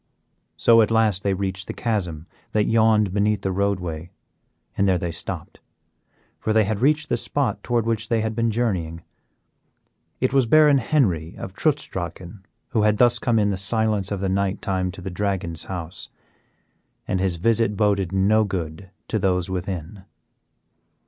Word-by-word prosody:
So 115 -1 +6
at 110 - +2
last 110 -4 +2
they 100 -1 0
reached 95 0 -3
the - - -5
chasm 90 -9 -2 0.3
that 105 - +3
yawned 110 -3 +3
beneath 105 +1 +1
the 95 - 0
roadway, 90 -4 -2 0.7
and 100 - +2
there 95 -1 +3
they 85 -1 -3
stopped, 85 - -6 0.8
for 110 - -1
they 110 0 +4
had 105 0 -2
reached 150 +3 +2
the - - 0
spot 145 -2 -1
toward 120 -2 0
which 115 -1 -1
they 115 -2 +2
had 110 0 -2
been 115 0 +1
journeying. 95 -8 -2 1.2
It 130 +1 0
was 135 -3 +3
Baron 150 +1 +6
Henry 95 - 0
of 95 - -7
Trutz 145 +6 0
Drachen 90 +2 -7 0.3
who 110 - +1
had 105 0 +3
thus 120 0 +4
come 120 -1 +1
in 105 -1 +2
the 95 - -2
silence 105 0 0
of 100 -2 -2
the 100 - 0
night 95 0 0
time 95 -1 -1
to 95 - -11
the 95 - -5
Dragon's 90 -4 -2
house, 90 -1 -6 1.0
and 95 - 0
his 95 -2 +1
visit 110 +3 +1
boded 100 -4 +1
no 100 +3 +3
good 95 -2 -5 0.2
to 110 - -1
those 90 -1 0
within. 95 +1 -5
100 Hz, 170 wpm, -23 LUFS, 95-110 Hz, 1.2 s, So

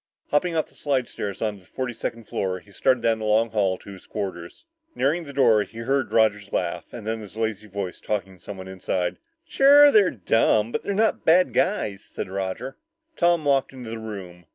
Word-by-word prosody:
Hopping 165 +3 +1
off 160 - +1
the - - -18
slidestairs 125 -8 -2
onto 105 -2 -2
the 90 - -22
forty 130 -2 -4
second 115 0 -5
floor, 95 -3 -2
he 100 +3 -21
started 120 +4 +1
down 115 -1 +2
the 110 - -4
long 110 +1 +2
hall 95 -4 +1
to 100 - -12
his 95 - -13
quarters. 95 - -6 0.3
Nearing 160 +5 +1
the 140 - -8
door, 115 -6 +4
he 115 +2 -8
heard 130 +3 0
Roger's 105 -3 +2
laugh, - - -2
and - - -8
then 110 0 -2
his 105 -1 -11
lazy 110 -2 -2
voice 100 -2 -5
talking 95 -3 -3
to 85 - -21
someone 95 -2 -8
inside. 95 -1 -2 0.3
"Sure, 285 +1 +7
they're 205 -6 +5
dumb, 110 +1 +2
but - - -2
they're 200 - -3
not 220 +2 +1
bad 180 +3 +4
guys," 105 - 0
said - - -6
Roger. 95 +6 -4 0.4
Tom 170 -2 +2
walked 135 -2 +2
into 125 -4 -8
the 115 - -5
room. 95 -6 -8
110 Hz, 200 wpm, -24 LUFS, 100-135 Hz, 0.4 s, Sure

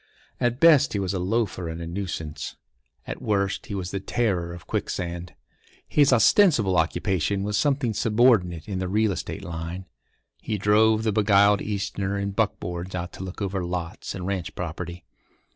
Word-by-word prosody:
At 120 0 0
best 155 -4 +6
he 100 - 0
was 95 -1 -1
a 95 - -1
loafer 90 -3 -1
and 80 +1 -6
a 85 - -5
nuisance; 85 -3 -5 0.5
at - - -6
worst 100 -2 -1
he 100 - -4
was 90 -2 -4
the 100 - -2
Terror 95 -5 -1
of 85 0 -10
Quicksand. 85 0 -4 0.5
His 145 -2 +4
ostensible 120 - +5
occupation 90 +3 0
was 105 0 -1
something 135 -2 +1
subordinate 105 -8 +2
in 95 -3 -3
the 95 - -2
real 105 +2 +2
estate 95 +2 -5
line; 85 +1 -5 0.6
he 110 - -2
drove 110 +2 +3
the 110 - +1
beguiled 100 -1 +4
Easterner 100 -1 -2
in 100 0 -2
buckboards 90 -3 -2
out 90 0 -4
to - - -7
look 95 +2 -6
over 95 -1 -2
lots 85 -1 -4
and 90 -2 -5
ranch 95 -3 -3
property. 85 +1 -6
95 Hz, 165 wpm, -25 LUFS, 90-110 Hz, 0.6 s, best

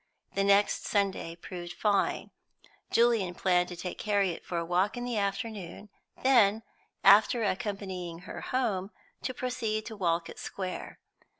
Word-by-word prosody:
The 195 - +1
next 200 +1 +3
Sunday 195 -5 0
proved 175 0 -7
fine; 205 -1 0 0.6
Julian 230 -6 +3
planned 180 -1 +2
to 175 - -6
take 175 +1 -6
Harriet 200 -5 0
for 175 - -4
a 170 - -1
walk 185 +7 +1
in 245 - -3
the 240 -3 -1
afternoon, 200 -1 -4 0.3
then, 225 -5 +5 0.4
after 210 +4 +6
accompanying 190 -4 -3
her - - -8
home, 210 -7 -1 0.3
to 255 - -3
proceed 230 -4 -2
to 225 - -7
Walcot 170 -4 -1
Square. 185 -2 -5
200 Hz, 135 wpm, -30 LUFS, 180-220 Hz, 0.6 s, after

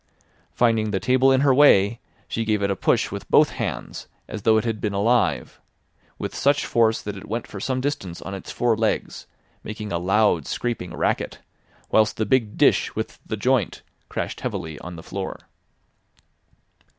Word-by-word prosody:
Finding 115 -3 +2
the 95 -2 -1
table 130 +6 +3
in 130 0 +4
her 140 -2 +4
way 115 -6 +5 0.3
she 115 - -2
gave 105 -2 0
it 100 - +1
a - - 0
push - - +1
with - - -7
both - - +5
hands - - -5 0.2
as 110 - -6
though 110 +1 +4
it 110 - 0
had 110 -2 -2
been 105 -2 -1
alive, 115 +5 +1 0.6
with - - -5
such 140 +1 +2
force 115 -1 +2
that 105 -1 -5
it 95 - -10
went 115 +2 -3
for 105 - -8
some 130 +5 -1
distance 115 -11 -3
on 95 - -7
its 95 - -7
four 120 -2 +1
legs, 110 0 -2 0.4
making 105 -1 -6
a 85 - 0
loud, 95 -3 +2
scraping 115 -7 -3
racket, - - -1 0.5
whilst 110 0 +3
the 110 - 0
big 110 -2 +1
dish - - +3
with - - -4
the 110 - -3
joint 125 -1 0 0.3
crashed - - -4
heavily 80 -2 -4
on 90 0 -8
the 80 - -10
floor. 95 0 -5
110 Hz, 175 wpm, -23 LUFS, 100-120 Hz, 0.6 s, way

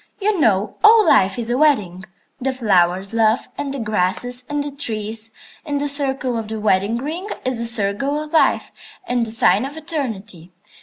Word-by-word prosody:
"You 410 -2 0
know, 205 -6 +1
all 435 0 +7
life 195 - +3
is 235 0 -3
a 250 - 0
wedding. 205 - +1 0.4
The 265 0 -1
flowers 190 -5 +1
love, 225 +1 +2
and 285 -1 -4
the 275 - -4
grasses, 225 +3 -1
and 290 0 -1
the 290 - -6
trees; 225 -5 -3 0.3
and 290 -3 -2
the 290 - -1
circle 270 -3 0
of 220 - -6
the 220 0 -5
wedding 210 +2 +1
ring 325 - -5 0.2
is 255 -2 -1
the 235 - -1
circle 230 +6 0
of 305 - -12
life 320 - +2 0.4
and 245 -4 0
the - - -1
sign 220 -1 +4
of 280 +3 -6
eternity. 220 - -5
240 Hz, 185 wpm, -20 LUFS, 210-285 Hz, 0.4 s, all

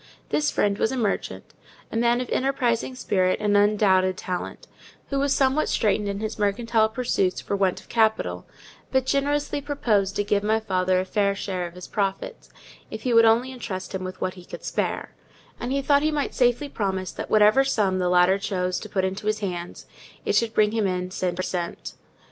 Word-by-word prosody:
This 295 -1 +1
friend 200 -1 0
was 220 - +1
a 265 - -3
merchant, 215 -5 -3 0.4
a - - -6
man 235 +1 +2
of 250 - -5
enterprising 255 -2 0
spirit 185 -6 +1
and 210 -1 +1
undoubted 200 -3 +3
talent, 185 - -5 0.5
who 275 - +1
was 280 0 +1
somewhat 270 +2 +2
straitened 210 -1 +1
in 200 +1 -4
his 215 0 -4
mercantile 220 +2 +2
pursuits 220 -6 0
for - - -3
want 195 -2 +1
of - - -18
capital; 220 -2 0 0.4
but 265 -1 +2
generously 285 +2 0
proposed 215 -9 0
to 205 - +1
give 205 0 +1
my 215 +2 +1
father 185 -3 +1
a 185 - -1
fair 200 +1 +1
share 185 -3 -3
of 170 - -13
his 180 - -9
profits, 200 - -3 0.4
if - - -7
he 250 -3 +1
would 230 0 +7
only 235 +3 +3
entrust 200 -8 -6
him 190 -1 -3
with 185 0 -6
what 185 - -2
he 180 -1 -13
could - - -10
spare; - - -2 0.5
and 245 - -4
he 275 0 0
thought 285 0 +4
he 310 - +2
might 295 -2 -2
safely 245 +3 +2
promise 190 -7 -3
that - - -7
whatever 215 +5 +5
sum 205 -8 +1
the 180 -1 +1
latter 180 +2 +4
chose 185 -2 -1
to 215 - -9
put 190 -2 0
into 195 +3 -4
his 215 0 +1
hands, 175 -3 -5 0.4
it - - +1
should 230 -1 +1
bring 210 -1 +4
him 220 -2 0
in 180 0 -2
cent. 180 -2 -2
per 185 - -3
cent. 175 -2 -4
210 Hz, 200 wpm, -24 LUFS, 185-245 Hz, 0.5 s, would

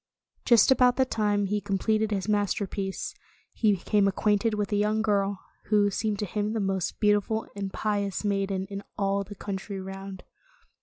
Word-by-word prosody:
Just 235 0 +6
about 250 -1 +5
the 260 - +3
time 205 -4 0
he 205 +1 -1
completed 215 +2 0
his 200 -2 -2
masterpiece, 200 -2 -1 0.4
he 215 -2 +3
became 200 +2 +2
acquainted 210 +2 +1
with 205 -1 -2
a - - +2
young 210 +1 +1
girl, 200 -2 +1 0.3
who, 205 -1 +3
seemed 210 +1 -1
to 210 - -2
him 210 +2 -2
the 225 - -1
most 190 -3 -1
beautiful 210 +1 +2
and 200 -1 -4
pious 205 -1 -2
maiden 195 -1 0
in 200 0 -4 0.2
all 200 0 +1
the 205 +1 -10
coun 200 0 -4
try 195 +1 -7
round. 195 0 -7
205 Hz, 170 wpm, -27 LUFS, 195-215 Hz, 0.4 s, Just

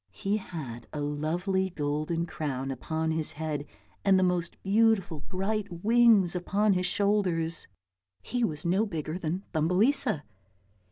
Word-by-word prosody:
He 205 +1 -1
had 135 - -7
a 150 - -5
lovely 170 +6 -1
golden 155 +1 -2
crown 135 -5 -3
upon 160 +5 -2
his 160 -1 +3
head 150 -2 -4 0.4
and 195 -1 +5
the 185 - +3
most 180 -2 -1
beautiful 200 -5 +2
bright 200 +5 -2 0.2
wings 225 -5 +5
upon 200 +4 +2
his 180 0 0
shoulders; 180 -5 +1 0.6
he 245 - -2
was 155 -8 -2
no 190 +6 +2
bigger 160 -1 -4
than 175 +3 -3
Thumbelisa. 180 - +2
175 Hz, 130 wpm, -28 LUFS, 155-200 Hz, 0.6 s, and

